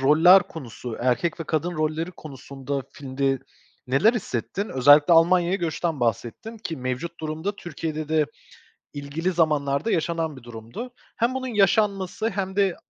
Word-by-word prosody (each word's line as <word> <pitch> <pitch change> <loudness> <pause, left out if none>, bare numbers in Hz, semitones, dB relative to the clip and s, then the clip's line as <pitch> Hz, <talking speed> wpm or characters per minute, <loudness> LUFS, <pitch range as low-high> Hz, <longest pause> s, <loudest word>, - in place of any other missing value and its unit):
roller 160 +7 +7
konusu, 125 - -8
erkek 130 +8 0
ve - - -3
kadın 160 +3 -1
rolleri 155 +2 -1
konusunda 140 -3 -6
filmde 135 0 -1 0.5
neler 140 - +4
hissettin? 195 - -3
Özellikle 145 +5 +6
Almanya'ya 175 +2 +4
göçten 165 -2 -2
bahsettin 120 - -2
ki 200 -7 -5
mevcut 130 +6 -4
durumda 160 +6 -3
Türkiye'de 155 -3 -5
de 155 -1 +2 0.7
ilgili 145 +6 -3
zamanlarda 150 +1 +1
yaşanan 165 -3 -1
bir 130 - -12
durumdu. 120 - -8 0.2
Hem 240 +3 +1
bunun 260 0 -3
yaşanması 205 -1 +1
hem 195 -1 -3
de 195 -3 +2
160 Hz, 135 wpm, -24 LUFS, 140-185 Hz, 0.7 s, roller